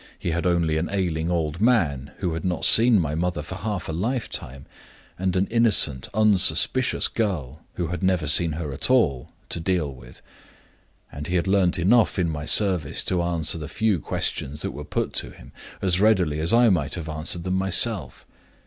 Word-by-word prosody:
He 85 Hz, -, -4 dB
had 85 Hz, +2 st, -1 dB
only 85 Hz, -3 st, +1 dB
an 80 Hz, +2 st, -2 dB
ailing 85 Hz, -4 st, -2 dB
old 80 Hz, 0 st, -2 dB
man 80 Hz, -, +1 dB
(who 90 Hz, -4 st, -3 dB
had 80 Hz, -, -5 dB
not 90 Hz, -3 st, -1 dB
seen 115 Hz, -1 st, +6 dB
my 80 Hz, -4 st, -2 dB
mother 85 Hz, -1 st, -2 dB
for 95 Hz, -, -8 dB
half 100 Hz, -1 st, -5 dB
a -, -, -4 dB
lifetime) 85 Hz, -, -4 dB, 0.5 s
and 95 Hz, 0 st, -1 dB
an 95 Hz, +1 st, +1 dB
innocent, 105 Hz, -, +2 dB
unsuspicious 110 Hz, +3 st, +2 dB
girl 80 Hz, -, -3 dB
(who 85 Hz, -3 st, -3 dB
had 90 Hz, +2 st, -5 dB
never 95 Hz, -4 st, 0 dB
seen 80 Hz, +2 st, +3 dB
her 75 Hz, -3 st, -5 dB
at -, -, 0 dB
all) 75 Hz, -, +1 dB, 0.2 s
to -, -, -2 dB
deal 80 Hz, -4 st, -1 dB
with; -, -, -15 dB, 0.9 s
and 75 Hz, +2 st, -7 dB
he 90 Hz, -, -2 dB
had 85 Hz, -, +1 dB
learned 95 Hz, -2 st, +2 dB
enough 105 Hz, +8 st, +2 dB
in 85 Hz, -3 st, 0 dB
my 75 Hz, -1 st, -5 dB
service 90 Hz, -8 st, +2 dB
to 90 Hz, -2 st, 0 dB
answer 85 Hz, -2 st, -1 dB
the 75 Hz, -, -6 dB
few 105 Hz, -1 st, 0 dB
questions 75 Hz, +1 st, -3 dB
that -, -, -3 dB
were 75 Hz, -, -8 dB
put -, -, -3 dB
to -, -, -2 dB
him -, -, -15 dB, 0.3 s
as 95 Hz, -1 st, +1 dB
readily 95 Hz, -9 st, +2 dB
as 80 Hz, +2 st, 0 dB
I 120 Hz, 0 st, +5 dB
might 80 Hz, -6 st, -1 dB
have 85 Hz, -3 st, -7 dB
answered 80 Hz, +2 st, -3 dB
them 90 Hz, -, -3 dB
myself. 95 Hz, -, +2 dB
85 Hz, 190 wpm, -23 LUFS, 80-95 Hz, 0.9 s, seen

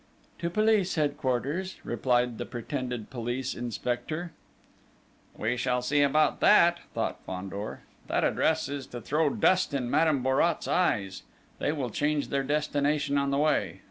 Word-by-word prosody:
"To 170 Hz, -, -1 dB
Police 215 Hz, -1 st, +2 dB
Headquarters," 145 Hz, +4 st, -1 dB
replied 120 Hz, 0 st, 0 dB
the -, -, -3 dB
pretended 125 Hz, -2 st, -4 dB
police 125 Hz, +1 st, -3 dB
inspector. 125 Hz, +8 st, -3 dB, 1.1 s
"We 110 Hz, +3 st, 0 dB
shall 125 Hz, 0 st, 0 dB
see 145 Hz, +3 st, +2 dB
about 150 Hz, +2 st, +3 dB
that!" 175 Hz, -4 st, +5 dB, 0.2 s
thought -, -, -2 dB
Fandor. 95 Hz, +3 st, -6 dB, 0.3 s
"That -, -, 0 dB
address 160 Hz, 0 st, +1 dB
is 140 Hz, -1 st, -5 dB
to 120 Hz, -, -7 dB
throw 150 Hz, +6 st, +1 dB
dust 185 Hz, +1 st, +2 dB
in 125 Hz, -3 st, -2 dB
Madame 150 Hz, -3 st, +3 dB
Bourrat's 135 Hz, +6 st, +1 dB
eyes. 100 Hz, -, 0 dB, 0.4 s
They -, -, 0 dB
will 135 Hz, -6 st, -3 dB
change 145 Hz, +4 st, 0 dB
their 140 Hz, -, 0 dB
destination 145 Hz, 0 st, 0 dB
on 140 Hz, 0 st, 0 dB
the 140 Hz, -, +1 dB
way. 150 Hz, +1 st, +1 dB
140 Hz, 140 wpm, -28 LUFS, 125-155 Hz, 1.1 s, that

